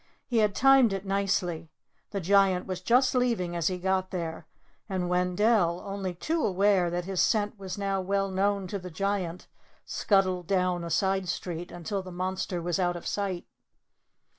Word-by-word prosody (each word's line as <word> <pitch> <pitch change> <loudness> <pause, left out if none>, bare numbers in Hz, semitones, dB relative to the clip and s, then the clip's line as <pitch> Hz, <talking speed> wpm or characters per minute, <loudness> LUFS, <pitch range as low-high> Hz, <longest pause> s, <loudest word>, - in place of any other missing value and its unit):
He 240 - -1
had 210 -2 +2
timed 270 -5 +5
it 195 0 -4
nicely. 190 -4 -1 0.4
The 200 - -3
Giant 190 0 +3
was 185 -1 -4
just 250 +6 +3
leaving 230 -9 0
as 170 -2 0
he 185 - 0
got 185 +1 0
there; 165 -3 -5 0.4
and 185 -2 -1
Wendell, 180 0 +2
only 195 -2 -4
too 320 - -1
well - - +2
aware 195 -2 +3
that 175 0 -3
his 190 -1 0
scent 210 -1 +1
was 190 -1 -6
now 195 -1 -1
well 195 +1 0
known 200 +1 +1
to 200 - -3
the 180 0 -8
Giant, 185 -1 -2 0.4
scuttled 185 -4 +1
down 180 -2 +1
a 170 - -5
side 190 +2 +1
street 175 +1 -4
until 175 +3 -4
the 185 -1 -9
monster 185 -1 -3
was 175 +1 -1
out 175 -1 +1
of 175 - -8
sight. 195 -4 -2
190 Hz, 175 wpm, -28 LUFS, 175-200 Hz, 0.4 s, timed